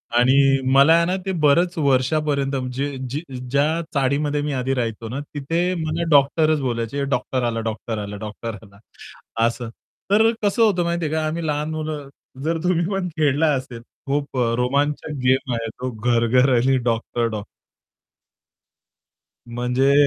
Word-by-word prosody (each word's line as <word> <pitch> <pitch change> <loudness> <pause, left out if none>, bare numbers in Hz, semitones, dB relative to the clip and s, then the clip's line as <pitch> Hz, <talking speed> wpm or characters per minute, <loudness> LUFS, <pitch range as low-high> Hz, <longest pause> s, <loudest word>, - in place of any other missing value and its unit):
आणि 135 +2 +4
मला 140 +4 +7
आहे 170 0 +4
ना, 180 - 0
ते 190 - -1
बरेच 170 +5 +3
वर्षापर्यंत 140 0 +1 0.2
जे 140 +2 -3
जे 145 +5 -3 0.3
ज्या 140 +3 +3 0.3
चाळीमध्ये 145 +1 +1
मी 145 -1 -2
आधी 130 +1 -1
राहायचो 115 -3 -3
ना, 130 +5 -4
तिथे 165 +6 -1
मला 160 +2 -2
डॉक्टरच 155 +2 +4
बोलायचे, 120 +2 -2
डॉक्टर 130 -1 -1
आला, 115 -1 -2
डॉक्टर 110 +1 -5
आला 100 0 -6
डॉक्टर 110 +2 -6
आला 100 -2 -17 0.7
असं. 120 0 -2 0.4
तर 220 +2 +5
कसं 205 +3 +1
होतं 195 -6 +3
माहिती 170 0 -1
आहे 155 - -2
का 160 0 0
आम्ही 165 +1 -3
लहान 150 +1 -1
मुलं 155 -2 -4 0.4
जर 165 +1 0
तुम्ही 175 -1 +1
पण 195 -2 -1
खेळला 150 +1 +2
असेल 130 -3 -5 0.3
खूप 140 -1 -2
अ, 120 -2 +1
रोमांचक 140 +5 0
गेम 130 0 +2
आहे 115 -1 -2
तो 130 - -2
घर-घर 120 +3 +2
आणि 130 +3 +3
डॉक्टर-डॉक्ट 115 -2 -1 2.1
म्हणजे 125 +3 +2
140 Hz, 150 wpm, -22 LUFS, 125-155 Hz, 2.1 s, मला